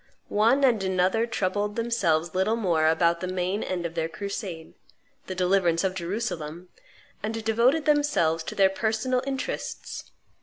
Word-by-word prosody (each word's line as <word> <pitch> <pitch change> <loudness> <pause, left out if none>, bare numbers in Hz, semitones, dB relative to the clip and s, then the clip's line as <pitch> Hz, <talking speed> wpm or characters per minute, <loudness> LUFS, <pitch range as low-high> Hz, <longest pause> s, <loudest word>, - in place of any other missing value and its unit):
One 230 +7 +3
and 235 -7 +3
another 190 +4 +1
troubled 205 -1 -1
themselves 175 -9 0
little 190 +4 +1
more 170 -8 +2
about 170 +1 +3
the 185 - -3
main 185 +3 -1
end 180 -2 -3
of 170 - -4
their 165 -1 -1
crusade, 190 -3 -6 0.5
the 185 - -4
deliverance 180 -2 +2
of 190 -1 0
Jerusalem, 175 -3 -4 0.5
and 220 +1 -3
devoted 240 +8 +3
themselves 290 - +2
to - - -5
their 195 -1 +4
personal 225 +5 0
interests. 270 -1 -4
190 Hz, 145 wpm, -26 LUFS, 170-225 Hz, 0.5 s, their